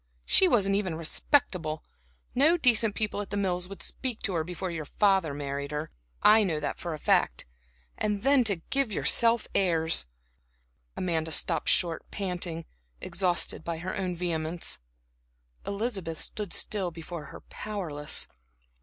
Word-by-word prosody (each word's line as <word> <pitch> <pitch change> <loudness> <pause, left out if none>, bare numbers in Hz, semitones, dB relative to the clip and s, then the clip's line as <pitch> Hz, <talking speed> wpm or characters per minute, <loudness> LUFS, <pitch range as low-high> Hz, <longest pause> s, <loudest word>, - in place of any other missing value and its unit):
She 380 - +5
wasn't 200 - +3
even 190 -5 -1
respectable; 165 - 0 0.5
no 310 +7 +4
decent 230 -7 +3
people 210 -1 -2
at 205 - -7
The 205 - -3
Mills 180 -3 -1
would 195 +1 -8
speak 250 -4 -3
to 195 - -1
her 165 -2 0
before 180 +2 -5
your 160 -3 -5
father 190 -2 +2
married 140 0 -4
her 150 +1 -4 0.3
I 215 +1 +7
know 165 -6 -1
that 150 - -4
for 170 -2 -4
a - - -8
fact. - - +1 0.5
And 210 -1 -1
then 275 -1 +5
to 195 -6 +1
give 275 -4 +4
yourself 230 +2 +4
airs!" 160 - +2 0.9
Amanda 160 -3 -1
stopped - - +2
short, 170 -3 +3
panting, 175 -4 -3 0.3
exhausted 175 - 0
by 170 0 -3
her 180 +3 -5
own 185 -2 -2
vehemence. 170 -1 -1 0.9
Elizabeth 200 -6 -3
still 210 -3 -4
stood 180 -1 +1
before 165 -1 -7
her - - -11
powerless. 170 -9 -3
180 Hz, 145 wpm, -28 LUFS, 160-210 Hz, 0.9 s, I